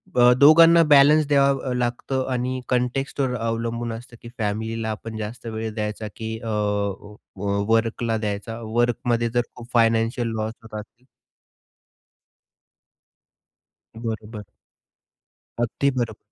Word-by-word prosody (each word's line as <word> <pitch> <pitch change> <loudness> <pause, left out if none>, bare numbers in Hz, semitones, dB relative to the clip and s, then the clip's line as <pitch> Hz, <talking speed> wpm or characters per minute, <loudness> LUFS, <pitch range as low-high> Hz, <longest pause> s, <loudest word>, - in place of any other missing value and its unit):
अ, 125 0 +6
दोघांना 165 +4 +8
बॅलन्स 145 +1 +6
द्यावा 140 -2 +2
लागत 120 +2 -2 0.2
आणि 130 0 -2
कॉन्टेक्स्टवर 125 +1 -1
अवलंबून 115 +1 -2
असतं 120 +1 -10
की 120 - -10
फॅमिलीला 110 +1 -2
आपण 110 +1 -7
जास्त 110 +3 -6
वेळ 110 -1 -4
द्यायचा 105 0 -3
की 110 0 -5
अ, 115 - -8
व 100 -1 -3
वर्कला 115 0 0
द्यायचा. 105 +1 -4
वर्कमध्ये 120 +1 0
जर 120 +1 +1
खूप 120 -1 -11
फायनान्शियल 115 +1 +2
लॉस 110 +1 -2
होत 110 -1 -7
असेल 115 +4 -14 2.9
बरोबर. 110 -2 -6 1.2
अगदी 140 +4 0
बरोबर. 115 -3 -2
115 Hz, 110 wpm, -23 LUFS, 110-125 Hz, 2.9 s, दोघांना